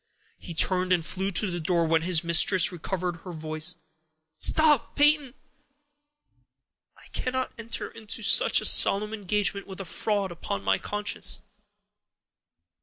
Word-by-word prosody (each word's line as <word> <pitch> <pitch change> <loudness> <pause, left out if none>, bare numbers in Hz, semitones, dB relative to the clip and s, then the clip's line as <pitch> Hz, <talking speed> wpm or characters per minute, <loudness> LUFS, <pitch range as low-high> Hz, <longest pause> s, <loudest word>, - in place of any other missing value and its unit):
He 170 - -10
turned 185 +2 +1
and 175 -3 +1
flew 190 +3 -2
to 195 +2 +2
the 175 - -4
door, 170 +1 0
when 160 0 +1
his 170 -1 0
mistress 170 +3 +4
recovered 180 0 -5
her 180 +2 -11
voice:— 155 +1 -3 0.6
"Stop, 300 -5 +3
Peyton! 290 -3 +2 1.6
I - - -19
cannot 255 0 -4
enter 230 0 -6
into 225 0 -7
such - - +4
a - - -3
solemn 210 +2 +5
engagement 205 -1 -1
with 190 -1 -10
a 195 - -6
fraud 200 +1 -2
upon 130 -12 -6
my 95 0 0
conscience. 210 0 -5
190 Hz, 135 wpm, -25 LUFS, 170-210 Hz, 1.6 s, solemn